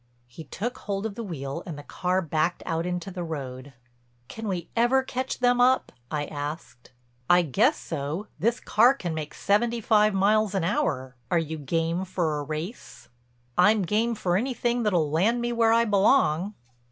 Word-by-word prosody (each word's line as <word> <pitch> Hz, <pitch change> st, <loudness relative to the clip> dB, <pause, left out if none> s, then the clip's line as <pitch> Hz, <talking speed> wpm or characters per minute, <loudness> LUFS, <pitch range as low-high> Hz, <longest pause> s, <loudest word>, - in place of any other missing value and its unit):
He 120 Hz, +6 st, -11 dB
took 235 Hz, -, -5 dB
hold 200 Hz, 0 st, -3 dB
of 220 Hz, -, -3 dB
the 230 Hz, -, -6 dB
wheel 145 Hz, -5 st, -5 dB
and 160 Hz, -4 st, -6 dB
the 145 Hz, -, -9 dB
car 185 Hz, +4 st, -1 dB
backed 160 Hz, +2 st, -1 dB
out 165 Hz, +1 st, -1 dB
into 180 Hz, +1 st, -3 dB
the 180 Hz, -1 st, -5 dB
road. 135 Hz, -4 st, -6 dB, 0.6 s
"Can 225 Hz, -1 st, -6 dB
we 180 Hz, -4 st, -3 dB
ever 240 Hz, +3 st, +3 dB
catch 260 Hz, 0 st, -3 dB
them 245 Hz, 0 st, +3 dB
up?" 255 Hz, +1 st, +3 dB, 0.2 s
I 150 Hz, -1 st, -2 dB
asked. 145 Hz, -5 st, -7 dB, 0.4 s
"I 175 Hz, 0 st, +6 dB
guess 220 Hz, -, +2 dB
so—this 175 Hz, -, -3 dB
car 245 Hz, +5 st, +4 dB
can 175 Hz, -10 st, -4 dB
make 155 Hz, -1 st, -5 dB
seventy 230 Hz, +4 st, +1 dB
five 215 Hz, -2 st, +3 dB
miles 210 Hz, +1 st, +2 dB
an 190 Hz, -, +1 dB
hour. 165 Hz, -, -1 dB
Are 175 Hz, -, +2 dB
you 160 Hz, -1 st, -2 dB
game 165 Hz, +5 st, -1 dB
for 170 Hz, -5 st, -1 dB
a -, -, -3 dB
race?" 155 Hz, -, -7 dB, 0.5 s
"I'm 210 Hz, +3 st, +5 dB
game 225 Hz, +6 st, +1 dB
for 180 Hz, -4 st, 0 dB
anything 240 Hz, +1 st, -1 dB
that'll 175 Hz, -9 st, +1 dB
land 205 Hz, +10 st, +2 dB
me 240 Hz, 0 st, -1 dB
where 230 Hz, -1 st, +3 dB
I 230 Hz, +1 st, +4 dB
belong." 200 Hz, -, +3 dB
185 Hz, 175 wpm, -26 LUFS, 155-225 Hz, 0.6 s, I